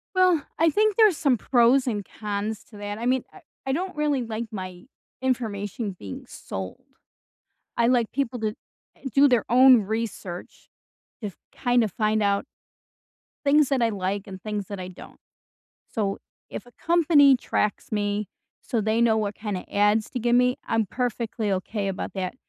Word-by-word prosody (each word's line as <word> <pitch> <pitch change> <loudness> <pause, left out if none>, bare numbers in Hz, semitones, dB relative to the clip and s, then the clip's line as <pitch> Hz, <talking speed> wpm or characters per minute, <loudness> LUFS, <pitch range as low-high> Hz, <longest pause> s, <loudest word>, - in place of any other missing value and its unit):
Well, 365 -4 +4 0.2
I 330 0 +5
think 425 +4 +2
there's 425 -7 +6
some 275 -5 +2
pros 250 +2 +3
and 205 -4 -2
cons 210 0 -3
to 210 - -15
that, 205 0 -5
I 235 - -4
mean, 255 0 +2
I 385 - -14 0.2
I 265 - -1
don't 365 +4 -3
really 295 -4 +1
like 225 0 -4
my 185 -3 -7 0.4
information 220 -4 -2
being 95 - -8
sold. 95 -1 -7 0.9
I 235 - +3
like 240 -3 +2
people 260 -2 -1
to 220 -1 0 0.5
eh, - - -27
do 280 +4 +6
their 245 -5 +3
own 255 0 +7
research 205 -4 -5 0.5
if 205 -4 -5 0.2
kinda 245 -3 +2
find 215 +2 +1
out 200 0 +1 1.0
things 290 0 +4
that 270 -3 +1
I 230 - +3
like 200 -1 -2
and 190 -1 -9
things 210 -2 -4
that 200 -2 -6
I 180 - -5
don't. 185 - -12 0.7
So, 200 -3 -1 0.3
if - - -7
a 245 - -17
company 305 -5 +5
tracks 210 -3 -2
me 205 -1 -1 0.3
so 235 - -1
they 220 +2 +1
know 225 -2 +4
what 205 -1 -2
kinda 205 -3 -4
ads 205 +1 +3
to 250 - -3
give 240 0 +2
me, 250 +1 +3
I'm 225 -2 +1
perfectly 230 -2 -2
okay 195 +2 -2
about 195 - -4
that, 185 -2 -3
225 Hz, 170 wpm, -25 LUFS, 205-255 Hz, 1.0 s, own